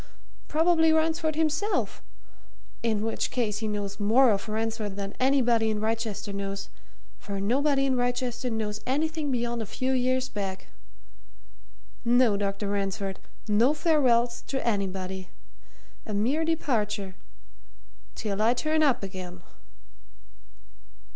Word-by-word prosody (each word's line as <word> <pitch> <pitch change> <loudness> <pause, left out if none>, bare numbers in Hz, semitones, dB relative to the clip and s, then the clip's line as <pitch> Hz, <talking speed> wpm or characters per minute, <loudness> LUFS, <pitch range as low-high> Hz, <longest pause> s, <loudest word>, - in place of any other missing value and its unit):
Probably 320 0 +4
Ransford 320 0 +1
himself 320 +7 0 0.8
in 220 -2 0
which 225 - -1
case 215 -4 -1
he 220 - -2
knows 205 -1 -3
more 230 +5 +5
of 200 +1 -1
Ransford 220 -2 -2
than 200 0 -4
anybody 245 -4 +3
in 215 -1 -1
Wrychester 220 -2 -2
knows 200 0 -4 0.5
for 200 -1 -5
nobody 275 +7 +2
in 265 -1 +2
Wrychester 245 0 -1
knows 215 -2 -2
anything 310 +2 0
beyond 240 -2 -1
a 220 - -5
few 260 +5 -1
years 255 0 +1
back. 195 -4 -5 1.3
No, 240 -2 +4
Dr. 200 0 -2
Ransford! 195 -1 -2 0.3
no 230 +8 +4
farewells 250 -7 +3
to 265 -3 -2
anybody! 190 -3 -2 0.8
A 210 - -3
mere 255 +10 +1
departure 210 - -1 1.0
till 205 -1 -2
I 230 +3 +4
turn 310 +4 +1
up 275 -8 +3
again." 185 -2 -7
230 Hz, 120 wpm, -27 LUFS, 205-265 Hz, 1.3 s, more